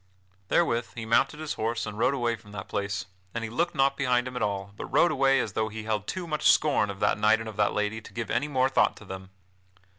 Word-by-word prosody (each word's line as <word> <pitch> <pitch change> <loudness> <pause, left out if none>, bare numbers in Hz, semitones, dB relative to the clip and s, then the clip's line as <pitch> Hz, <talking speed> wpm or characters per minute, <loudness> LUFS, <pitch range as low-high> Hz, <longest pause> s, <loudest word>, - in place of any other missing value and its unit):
Therewith 120 - +1
he 115 -2 -5
mounted 115 +6 +2
his 155 -1 -3
horse 115 +1 -2
and 105 - -6
rode 125 +5 +2
away 120 -3 0
from 105 -2 -16
that 95 -2 -6
place 100 -2 -2 0.3
And 115 - -2
he 115 - -5
looked 170 +8 0
not 135 0 +3
behind 125 -2 +1
him 125 - -7
at 125 - -3
all, 100 -1 -2
but - - -6
rode 155 +6 +4
away 135 -2 +3
as 110 -5 -2
though 110 +1 0
he 110 0 -7
held 105 -1 -2
too 185 -2 -3
much 155 -2 +3
scorn 140 -9 +2
of 100 -1 -6
that 105 - +2
knight 110 +1 +4
and 115 - -6
of 110 - -7
that 105 -1 +2
lady 105 +1 -1
to - - -14
give 115 -2 -4
any 145 - +1
more 130 -3 +2
thought 135 - +2
to 105 - -13
them. 95 0 -8
115 Hz, 260 wpm, -27 LUFS, 105-135 Hz, 0.3 s, rode